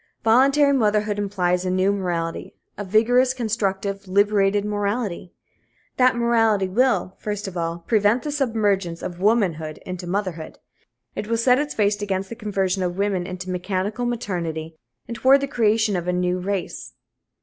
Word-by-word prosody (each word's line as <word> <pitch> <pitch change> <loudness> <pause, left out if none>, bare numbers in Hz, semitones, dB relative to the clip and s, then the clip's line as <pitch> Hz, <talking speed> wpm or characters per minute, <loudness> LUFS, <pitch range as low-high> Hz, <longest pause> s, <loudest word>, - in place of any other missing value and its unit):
Voluntary 275 +5 +4
motherhood 210 -4 +1
implies 180 -3 0
a 185 - -1
new 185 +2 +2
morality 170 -4 -3 0.2
a 205 - -5
vigorous, 245 +6 +3
constructive, 200 -4 -2
liberated 200 +1 +2
morality. 205 -3 -2 0.7
That 255 0 +4
morality 225 -4 +2
will, 235 -1 +1
first 210 -1 -4
of 190 - -7
all, 170 0 -3
prevent 215 +2 +2
the 295 - -3
submergence 205 - 0
of 175 -1 -6
womanhood 180 -8 +1
into 180 -1 -6
motherhood. 180 -4 -3 0.6
It 210 - -4
will 230 +1 0
set 250 +3 +4
its 295 0 -3
face 205 -1 +1
against 195 -1 -2
the 230 - -6
conversion 195 -4 -1
of 180 0 -2
women 195 -3 -1
into 185 0 -6
mechanical 195 +6 -2
maternity 170 -9 -4 0.3
and 235 - -5
toward 265 +4 +5
the 280 - -2
creation 220 -4 +1
of 175 -1 -3
a 180 - +1
new 180 0 0
race. 190 0 -4
205 Hz, 155 wpm, -22 LUFS, 185-225 Hz, 0.7 s, toward